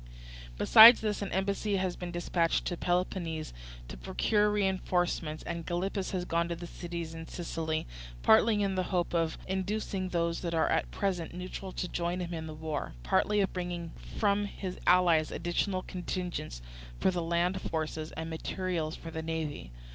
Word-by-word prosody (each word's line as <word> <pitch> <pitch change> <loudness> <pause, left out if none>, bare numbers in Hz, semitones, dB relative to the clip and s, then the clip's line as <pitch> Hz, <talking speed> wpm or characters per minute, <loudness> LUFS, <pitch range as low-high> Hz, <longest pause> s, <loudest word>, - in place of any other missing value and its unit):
"Besides 225 - +10
this, 210 -2 -1
an 200 - -3
embassy 200 +2 0
has 185 -2 0
been 180 - -6
dispatched 175 -1 0
to 175 - -1
Peloponnese 175 -2 -1 0.3
to - - -8
procure 210 - +1
reinforcements, 180 -5 0
and 170 -1 -4
Gylippus 185 +3 -2
has 180 -2 -2
gone 170 0 0
to 170 - -2
the 170 +1 -8
cities 170 -1 -6
in 165 0 -8
Sicily, 160 -2 -3 0.4
partly 205 - +5
in 195 -1 0
the 185 - +1
hope 175 -3 0
of 165 -2 +1
inducing 190 0 -2
those 170 -1 0
that 170 -2 -2
are 160 - +2
at - - +1
present 180 -4 -2
neutral 185 +1 -6
to 180 - -2
join 175 +1 -2
him 175 -1 -4
in 160 -1 -4
the 155 - -7
war, 155 -2 -4
partly 205 - +2
of 195 - 0
bringing 175 -2 -4 0.3
from 205 -1 +2
his 190 -2 -6
allies 175 -4 +5
additional 185 +2 -1
contingents 180 - -4 0.4
for - - +3
the 180 -1 -2
land 170 +3 0
forces 155 -1 -3
and 160 0 -5
material 165 0 -2
for 165 +1 -8
the 160 - -4
navy. 160 - -4
175 Hz, 170 wpm, -30 LUFS, 165-190 Hz, 0.4 s, Besides